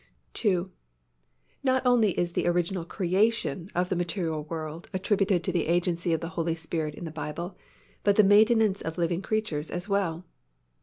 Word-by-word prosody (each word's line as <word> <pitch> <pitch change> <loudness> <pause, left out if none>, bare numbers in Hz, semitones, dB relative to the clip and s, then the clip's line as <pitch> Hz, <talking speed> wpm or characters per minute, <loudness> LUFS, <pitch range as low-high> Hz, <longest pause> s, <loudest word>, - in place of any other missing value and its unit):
II. 185 -5 +2 1.0
Not 260 -1 +2
only 235 -6 +4
is 175 0 0
the 175 - 0
original 175 +1 0
creation 190 0 0
of 180 +1 +1
the 185 - 0
material 170 -2 -1
universe 160 0 -6
attributed 190 -1 +1
to 185 - 0
the 170 -4 0
agency 170 0 +1
of 165 - +1
the 165 - -4
Holy 165 -2 -1
Spirit 160 -2 -3
in 170 - -7
the 160 - -5
Bible 165 +4 -5 0.5
but 200 -1 +4
the 215 - +6
maintenance 215 0 +5
of 160 0 -5
living 170 +1 0
creatures 200 -9 -2
as 175 +2 -4
well. 185 -4 -1
175 Hz, 165 wpm, -27 LUFS, 165-200 Hz, 1.0 s, the